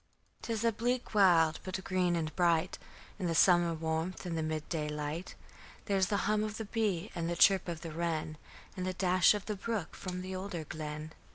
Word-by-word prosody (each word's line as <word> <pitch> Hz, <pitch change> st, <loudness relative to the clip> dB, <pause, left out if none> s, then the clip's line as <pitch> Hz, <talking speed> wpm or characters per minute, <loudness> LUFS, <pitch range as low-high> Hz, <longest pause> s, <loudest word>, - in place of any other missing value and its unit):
'Tis 225 Hz, -1 st, -2 dB
a 230 Hz, -, +4 dB
bleak 245 Hz, +3 st, -2 dB
wild, 170 Hz, -6 st, +5 dB
but 190 Hz, 0 st, -4 dB
green 180 Hz, -2 st, +1 dB
and 160 Hz, -2 st, -2 dB
bright 175 Hz, 0 st, +2 dB, 0.4 s
In 185 Hz, -, -1 dB
the 165 Hz, -, 0 dB
summer 175 Hz, 0 st, +5 dB
warmth 160 Hz, +3 st, -3 dB
and 175 Hz, -2 st, -3 dB
the 160 Hz, -, -1 dB
mid 155 Hz, -1 st, -3 dB
day 155 Hz, -3 st, -2 dB
light, 150 Hz, +4 st, -4 dB, 0.5 s
There's 195 Hz, -3 st, +2 dB
the 205 Hz, +1 st, 0 dB
hum 215 Hz, 0 st, +2 dB
of 215 Hz, 0 st, -4 dB
the 220 Hz, -, -4 dB
bee 205 Hz, -3 st, -1 dB
and 170 Hz, 0 st, -2 dB
the 175 Hz, -, -1 dB
chirp 190 Hz, +1 st, +5 dB
of 170 Hz, -2 st, -4 dB
the 165 Hz, -, -6 dB
wren, 155 Hz, -1 st, -2 dB, 0.4 s
And 185 Hz, -1 st, -3 dB
the 185 Hz, -, -1 dB
dash 185 Hz, +2 st, +4 dB
of 205 Hz, -, -5 dB
the 210 Hz, -, -3 dB
brook 205 Hz, -3 st, -3 dB
from 180 Hz, -1 st, -5 dB
the 185 Hz, 0 st, -5 dB
older 185 Hz, -3 st, -4 dB
glen. 155 Hz, 0 st, -6 dB
180 Hz, 205 wpm, -32 LUFS, 160-195 Hz, 0.5 s, wild